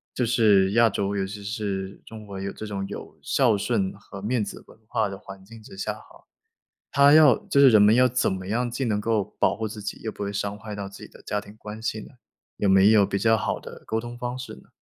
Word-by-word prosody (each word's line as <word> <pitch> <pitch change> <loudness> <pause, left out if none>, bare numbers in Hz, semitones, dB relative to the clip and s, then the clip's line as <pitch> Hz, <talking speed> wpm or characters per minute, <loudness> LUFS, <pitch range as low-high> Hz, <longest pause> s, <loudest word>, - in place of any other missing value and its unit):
就 125 - +1
是 105 -5 +4
亚 115 +1 +5
洲， 100 0 -2
尤 95 -1 -1
其 100 +1 -8
是 100 -2 -4
中 110 -1 -11
国 100 -1 -7
有 100 0 -3
这 110 - -8
种 100 -2 -4
有 100 - -9
孝 125 -6 +2
顺 100 -2 -1
和 100 -1 -11
面 115 0 0
子 - - -8
文 - - -18
化 110 -1 0
的 95 0 -7
环 95 -1 -12
境 115 +1 -13
之 95 - -13
下 100 - -2
哈， - - -17 0.7
他 140 +1 +6
要 150 -6 +7
就 140 - +1
是 135 -2 +8
人 110 -2 +6
们 105 +2 +6
要 125 +1 +5
怎 125 +1 +1
么 95 0 -5
样 120 +3 -1
既 130 +3 -3
能 105 -3 0
够 110 -2 0
保 - - +2
护 110 - -3
自 105 0 -7
己， 100 +1 -6
又 110 - -4
不 - - -8
会 100 - -2
伤 100 0 -3
害 105 0 -8
到 100 -1 -6
自 100 - -12
己 - - -23
的 - - -17
家 105 - -2
庭 105 +1 -15
关 105 0 -9
系 110 -1 -2
呢？ - - -12 0.5
有 100 - +1
没 95 +2 +6
有 105 -3 +5
比 100 0 -2
较 115 +2 +3
好 110 - -1
的 - - -11
沟 110 - -1
通 120 +1 -7
方 125 +1 -4
式 125 - -7
呢？ 65 - -19
105 Hz, 280 characters per minute, -25 LUFS, 100-115 Hz, 0.7 s, 是